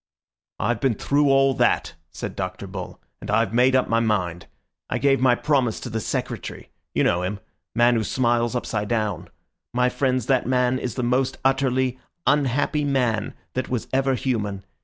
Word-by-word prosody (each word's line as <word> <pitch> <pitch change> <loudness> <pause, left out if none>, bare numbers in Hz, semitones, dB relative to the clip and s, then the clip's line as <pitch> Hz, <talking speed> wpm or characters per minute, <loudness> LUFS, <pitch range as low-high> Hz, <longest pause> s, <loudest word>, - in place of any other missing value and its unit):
"I've 115 +1 0
been 130 -5 +2
through 145 +6 +2
all 135 0 +4
that," - - +1 0.2
said - - -6
Dr. - - -4
Bull, - - -7 0.2
"and - - -8
I've 100 - +2
made 125 +2 +4
up 130 - +3
my 115 - +2
mind. 90 -7 -1 0.4
I - - 0
gave 135 -2 +2
my 130 -2 +5
promise 130 -5 +1
to 120 - -6
the 110 - -1
Secretary—you - - -4
know 85 - +2
him, 95 +3 -3 0.4
man 120 +1 +5
who 110 - 0
smiles 120 0 +1
upside 110 -4 -2
down. 105 -6 -1 0.5
My 125 0 +3
friends, 130 -2 0
that 130 -4 +1
man 125 0 +2
is 125 - -4
the 125 - -2
most 125 +2 +1
utterly 130 -1 +1 0.3
unhappy 145 +1 +2
man 125 -6 0 0.2
that 130 0 -2
was 125 -3 -2
ever 135 0 +2
human. 105 -7 -2
125 Hz, 170 wpm, -23 LUFS, 115-135 Hz, 0.5 s, my